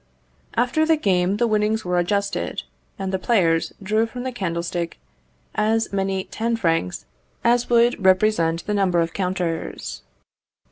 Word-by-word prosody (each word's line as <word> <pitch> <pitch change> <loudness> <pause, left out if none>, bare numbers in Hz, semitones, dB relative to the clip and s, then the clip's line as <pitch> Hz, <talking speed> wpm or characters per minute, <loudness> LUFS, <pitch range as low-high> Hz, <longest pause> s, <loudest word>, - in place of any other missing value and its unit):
After 250 +6 +2
the 320 0 +3
game 190 -5 +1
the 240 - +2
winnings 215 -1 +1
were 180 0 +1
adjusted, 200 - -1 0.3
and 190 0 -3
the 190 - 0
players 170 -8 +2
drew 215 +3 +1
from 245 +2 -7
the 260 - -2
candlestick 170 -5 -3 0.6
as 220 0 +1
many 195 -1 0
ten 230 +4 -2
francs 165 - -1 0.4
as 240 +1 +3
would 240 0 +3
represent 185 -3 +3
the 210 - -1
number 190 -4 +2
of 165 0 0
counters. 180 - -3
195 Hz, 140 wpm, -22 LUFS, 175-225 Hz, 0.6 s, the